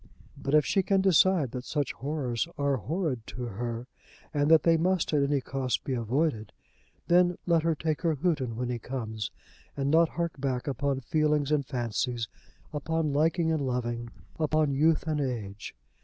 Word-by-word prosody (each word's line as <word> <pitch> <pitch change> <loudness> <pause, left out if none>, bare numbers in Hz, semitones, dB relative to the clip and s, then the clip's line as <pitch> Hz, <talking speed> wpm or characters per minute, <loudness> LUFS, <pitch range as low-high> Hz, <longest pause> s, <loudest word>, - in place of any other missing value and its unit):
But 140 +2 -1
if 150 - +5
she 195 - +2
can 195 +1 +2
decide 185 -6 +4
that 125 0 -5
such 145 0 -2
horrors 135 -3 -2
are 140 -1 +1
horrid 150 - -2
to 125 - -6
her, 120 +2 -4 0.5
and 145 0 +2
that 160 -2 +6
they 165 -1 +5
must 180 0 +1
at 145 - +4
any 140 0 +1
cost 130 -1 -2
be 135 - -2
avoided, 120 0 -1 0.5
then 175 0 +4
let 170 -2 +3
her 165 0 +1
take 155 +1 -2
her 165 -3 +1
Houghton 145 -7 0
when 125 +1 -2
he 120 -1 -2
comes, 110 -4 -4 0.5
and 140 0 0
not 165 +1 +5
hark 170 -5 -3
back 130 -3 -1
upon 140 0 -1
feelings 150 +1 +1
and 145 -3 +1
fancies, 120 -2 -2 0.5
upon 155 0 -1
liking 160 +3 +2
and 160 -2 0
loving, 120 -2 -2 0.3
upon 155 -1 +2
youth 155 +4 +3
and 155 -2 0
age. 110 -7 -4
145 Hz, 170 wpm, -28 LUFS, 125-160 Hz, 0.5 s, that